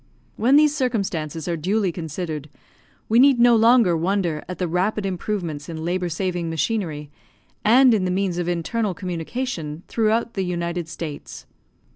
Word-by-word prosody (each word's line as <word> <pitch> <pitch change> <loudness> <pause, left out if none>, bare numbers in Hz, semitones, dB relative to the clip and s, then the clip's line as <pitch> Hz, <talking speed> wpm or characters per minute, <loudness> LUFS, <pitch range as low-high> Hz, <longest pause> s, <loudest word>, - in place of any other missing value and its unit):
When 250 +5 +3
these 300 0 +5
circumstances 190 - -2
are 170 - 0
duly 190 +4 0
considered, 160 -2 -5 0.6
we 225 +2 +4
need 270 -1 +6
no 240 0 +6
longer 225 -5 +5
wonder 170 -2 -1
at 180 - -5
the 180 - -1
rapid 190 +5 0
improvements 175 -5 -3
in 160 -1 -5
labour 180 0 -1
saving 175 0 -2
machinery, 160 -4 -2 0.5
and 245 +3 +6
in 205 -4 +1
the - - 0
means 180 -1 -1
of 175 - -2
internal 185 +4 -1
communication 170 -2 -4
throughout 225 +1 0
the 195 - -2
United 170 -1 -3
States. 165 -3 -7
180 Hz, 150 wpm, -22 LUFS, 165-220 Hz, 0.6 s, need